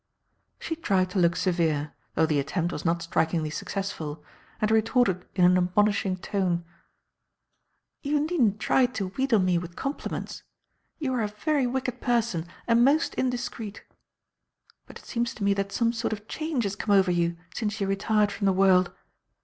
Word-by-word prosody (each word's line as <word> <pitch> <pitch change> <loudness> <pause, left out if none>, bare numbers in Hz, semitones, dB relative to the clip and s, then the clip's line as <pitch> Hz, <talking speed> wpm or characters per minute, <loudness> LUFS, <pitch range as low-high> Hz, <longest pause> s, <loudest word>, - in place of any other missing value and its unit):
She 325 - -4
tried 190 - +1
to 190 - 0
look 175 0 +3
severe, 160 -5 0 0.2
though 160 - +4
the 155 -2 +1
attempt 165 +5 -1
was - - -5
not 170 0 0
strikingly 160 -1 0
successful, 165 -4 -4 0.4
and 215 0 +1
retorted 220 -4 +2
in 180 -2 +5
an 180 +1 +6
admonishing 190 +1 +1
tone: 180 -3 -1 1.4
"You 295 +1 +1
needn't 265 - +1
try 255 +3 +3
to 220 -7 -4
wheedle 260 +3 +1
me 185 -3 +2
with 170 0 -8
compliments. 275 +2 -4 0.6
You 275 -5 -2
are 245 - 0
a 215 - 0
very 265 +6 0
wicked 255 -1 -3
person 230 -9 0 0.2
and 235 0 +4
most 290 +5 +3
indiscreet. 240 -4 -3 1.0
But - - -11
it - - -17
seems 235 +1 -2
to 210 - -6
me 200 0 +3
that 200 0 -2
some 230 +1 +1
sort 230 -1 -2
of 210 0 -8
change 310 -4 -2
has 200 -1 -2
come 205 0 +1
over 190 -2 +4
you 170 -1 0 0.2
since 215 -1 -2
you 200 - 0
retired 205 +2 +1
from 200 0 -3
the 195 - +4
world. 185 -1 +4
200 Hz, 170 wpm, -26 LUFS, 180-240 Hz, 1.4 s, an